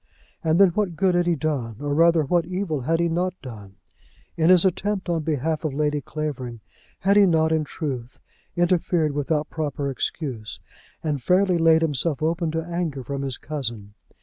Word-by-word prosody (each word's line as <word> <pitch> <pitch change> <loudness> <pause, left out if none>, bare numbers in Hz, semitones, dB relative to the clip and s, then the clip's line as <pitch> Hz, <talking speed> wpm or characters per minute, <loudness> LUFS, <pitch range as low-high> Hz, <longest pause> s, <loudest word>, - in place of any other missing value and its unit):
And 160 +2 +2
then 195 -2 +7
what 180 -1 -1
good 190 +1 +2
had 175 0 +2
he 170 - +3
done; 135 -7 -2
or 145 0 -2
rather 165 +1 +4
what 170 +3 +1
evil 180 -6 -2
had 165 +6 0
he 170 - +2
not 180 +2 -1
done? 105 -6 -10 0.6
In 165 +1 +2
his 185 0 +6
attempt 190 +1 -1
on 165 -2 0
behalf 155 +1 -1
of 150 -4 -2
Lady 150 0 0
Clavering 130 -6 -5 0.4
had 200 +1 +3
he 200 -1 +7
not, 160 -2 +2
in 160 -1 +2
truth, 130 -6 -5 0.4
interfered 175 -2 +2
without 150 +2 -1
proper 145 -3 -2
excuse, 125 -4 -4 0.4
and 150 -4 -1
fairly 180 +4 +3
laid 165 0 +5
himself 150 -1 0
open 165 +1 0
to 165 +1 -2
anger 170 -6 -3
from 140 +2 -4
his 135 -3 -3
cousin? 115 -9 -5
160 Hz, 175 wpm, -24 LUFS, 140-175 Hz, 0.6 s, then